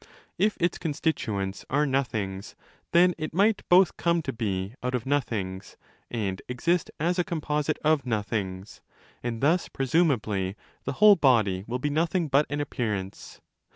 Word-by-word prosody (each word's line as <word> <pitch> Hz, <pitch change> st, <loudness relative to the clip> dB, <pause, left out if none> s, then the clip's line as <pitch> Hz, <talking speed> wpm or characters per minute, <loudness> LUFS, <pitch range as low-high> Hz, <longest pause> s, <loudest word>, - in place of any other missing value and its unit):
If 210 Hz, +3 st, +2 dB
its 175 Hz, 0 st, 0 dB
constituents 110 Hz, -, -2 dB
are 145 Hz, +3 st, +2 dB
nothings, 110 Hz, -8 st, -2 dB, 0.4 s
then 175 Hz, +1 st, +5 dB
it 155 Hz, 0 st, -4 dB
might 205 Hz, +3 st, +3 dB
both 180 Hz, 0 st, +5 dB
come 170 Hz, -1 st, +1 dB
to 135 Hz, -, -3 dB
be 100 Hz, -3 st, -3 dB
out 125 Hz, 0 st, -1 dB
of 125 Hz, 0 st, -3 dB
nothings 105 Hz, -9 st, -2 dB, 0.3 s
and 100 Hz, -5 st, -3 dB
exist 165 Hz, +7 st, 0 dB
as 175 Hz, +4 st, 0 dB
a -, -, +3 dB
composite 150 Hz, -2 st, -1 dB
of 155 Hz, -2 st, +3 dB
nothings: 105 Hz, -4 st, -3 dB, 0.4 s
and 115 Hz, -2 st, -4 dB
thus 165 Hz, +6 st, +2 dB
presumably 120 Hz, -, 0 dB, 0.3 s
the -, -, -2 dB
whole 210 Hz, -1 st, +7 dB
body 110 Hz, -, +3 dB
will 120 Hz, +2 st, -2 dB
be 145 Hz, +3 st, -2 dB
nothing 165 Hz, +2 st, 0 dB
but 140 Hz, +2 st, +3 dB
an 145 Hz, -, -2 dB
appearance. 105 Hz, -9 st, -4 dB
135 Hz, 150 wpm, -27 LUFS, 105-160 Hz, 0.4 s, whole